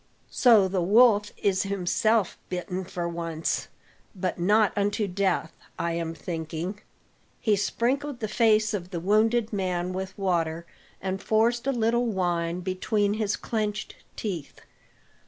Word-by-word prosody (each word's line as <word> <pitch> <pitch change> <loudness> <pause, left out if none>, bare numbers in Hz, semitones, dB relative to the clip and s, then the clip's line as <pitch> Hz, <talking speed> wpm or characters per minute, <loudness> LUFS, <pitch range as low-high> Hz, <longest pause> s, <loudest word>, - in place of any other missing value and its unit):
So 225 -6 +5
the 185 -1 -1
wolf 210 +2 +5
is 190 -2 +1
himself 200 +2 +1
bitten 180 +1 -3
for 175 -1 -4
once; 165 -1 -2 0.5
but 185 -1 -2
not 210 +4 +3
unto 205 +1 0
death, 180 -3 0 0.2
I 170 0 -1
am 165 -1 -3
thinking." 165 +4 -5 0.6
He 215 -2 +2
sprinkled 250 +7 -1
the 215 - -2
face 215 -1 +3
of 180 -3 -4
the 175 -3 -4
wounded 215 +5 +2
man 185 -2 -1
with 190 0 -5
water, 170 -4 -1 0.4
and 190 0 -2
forced 235 +4 +1
a - - +3
little 235 0 +1
wine 175 -4 -1
between 200 +3 0
his 215 -1 0
clenched 215 -2 -3 0.2
teeth. 175 -9 -5
195 Hz, 135 wpm, -26 LUFS, 175-215 Hz, 0.6 s, So